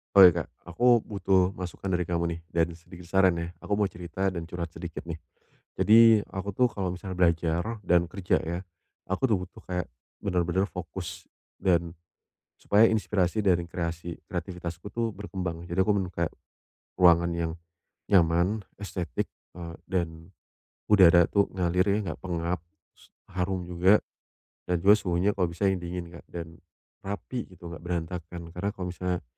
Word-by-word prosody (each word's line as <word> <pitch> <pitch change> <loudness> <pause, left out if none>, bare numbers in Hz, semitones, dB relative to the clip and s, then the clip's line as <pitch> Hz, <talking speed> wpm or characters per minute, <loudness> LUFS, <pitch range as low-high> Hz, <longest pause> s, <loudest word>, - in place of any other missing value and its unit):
Oh, 95 -1 +11
iya, 90 - +6
Kak. - - -18 0.3
Aku, 120 +3 +5
butuh 95 -2 +2
masukan 90 +1 -7
dari 90 - +1
kamu 85 0 -1
nih, 85 - -9
dan, 85 0 +2
sedikit 85 +1 -13
saran, 95 +1 +4
ya, 85 0 -3
aku 100 - -1
mau 105 - +3
cerita, 90 +1 -4
dan, 90 -3 -1
curhat 85 +1 -5
sedikit 85 -1 -7
nih. 85 - -4 0.7
Jadi, 110 0 +7
aku 95 +1 -4
tuh, 125 +4 +3
kalau 95 -5 -3
misalnya 95 0 -6
belajar, 85 +5 +1
dan, 90 -3 +3
kerja 90 +1 0
ya, 85 +2 -3 0.5
aku 95 +8 +1
tuh, 110 -6 +3
butuh 90 - -10
kayak, 90 -5 -3 0.3
benar-benar 90 0 0
fokus, 90 0 -7 0.3
dan, 85 -2 +1 0.6
supaya 105 +2 +4
inspirasi 105 -2 +1
dan 90 -4 +2
kreasi 85 -1 -5
kreatifitasku 90 -1 -5
tuh, 115 -1 0
berkembang. 90 -4 -5
Jadi, 85 +2 0
aku 100 +2 +3 0.2
kayak, 85 -1 0 0.7
ruangan 85 -1 +6
yang 85 -1 -1 0.6
nyaman, 90 +3 +3 0.2
estetik, 90 -5 -3 0.3
eee, 85 -1 -7
dan 85 -1 -3 0.6
udara 85 -4 +7
itu 100 -1 +3
ngalir 90 0 +1
ya, - - +2
nggak - - -6
pengap, 85 0 -1
terus 80 -1 -27 0.2
harum 90 -1 -1
juga, 90 +4 +4 0.7
dan, 90 - +1
juga 105 +2 +7
suhunya, 90 +2 +1
kalau 95 -3 0
bisa 90 +4 +1
yang 95 - -1
dingin, 90 0 -5
Kak, - - -19
dan 85 -1 -8 0.4
rapi, 100 +5 -5
gitu 90 -2 -11
enggak 85 - -7
berantakan. 85 0 -5
Karena, 90 +4 -2
kalau 90 -3 -4
misalnya 90 0 -2
90 Hz, 155 wpm, -28 LUFS, 85-95 Hz, 0.7 s, Oh